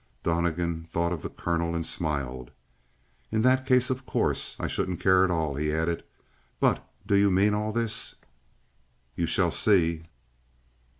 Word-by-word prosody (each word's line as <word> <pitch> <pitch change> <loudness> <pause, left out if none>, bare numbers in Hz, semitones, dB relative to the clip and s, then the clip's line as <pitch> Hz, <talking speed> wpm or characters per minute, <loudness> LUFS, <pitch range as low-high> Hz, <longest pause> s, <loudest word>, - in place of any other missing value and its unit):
Donnegan 85 0 -1
thought 85 +1 0
of 80 - -5
the - - -5
colonel 85 0 -2
and 85 -1 -2
smiled. 70 -7 -3 0.8
"In 110 0 +1
that 130 +1 +3
case, 125 -1 +3
of 130 +1 -3
course, - - 0
I - - -2
shouldn't 90 -2 -2
care 95 -1 +4
at 95 - +2
all." 80 -4 0
He 75 +1 0
added: 80 +2 -1 0.6
"But - - +2 0.2
do 100 - +2
you 100 0 +5
mean 100 +3 +3
all 105 +1 -1
this?" 115 -1 -1 1.0
"You 85 - -1
shall 85 +1 +2
see." 85 -7 +2
85 Hz, 155 wpm, -27 LUFS, 80-105 Hz, 1.0 s, you